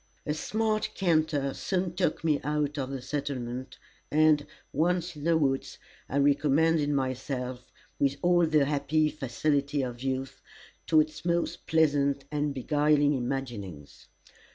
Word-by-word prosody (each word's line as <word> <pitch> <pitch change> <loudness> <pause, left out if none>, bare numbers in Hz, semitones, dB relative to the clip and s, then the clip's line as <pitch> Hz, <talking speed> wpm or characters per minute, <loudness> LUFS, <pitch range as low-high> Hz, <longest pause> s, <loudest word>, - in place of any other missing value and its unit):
A 150 - 0
smart 215 +6 -1
canter 155 -6 +1
soon 185 -2 -2
took 175 -4 -1
me 150 -3 +2
out 150 0 -1
of 130 -1 -3
the 135 -2 -5
settlement, 130 -3 -4 0.3
and, 155 -1 +4 0.3
once 175 +2 0
in 150 0 -8
the 165 -1 +4
woods, 135 -3 -1 0.3
I 140 - -1
recommended 145 +2 +3
myself 130 -2 -3 0.3
with 140 -1 +2
all 175 -1 +4
the 155 -3 +3
happy 150 +2 +1
facility 140 0 -1
of 120 -1 -5
youth, 135 0 -3 0.5
to 155 -1 +6
its 155 0 -5
most 170 0 -1
pleasant 140 -3 +2
and 150 -1 0
beguiling 145 +2 +2
imaginings. 120 - -5
145 Hz, 130 wpm, -28 LUFS, 135-155 Hz, 0.5 s, to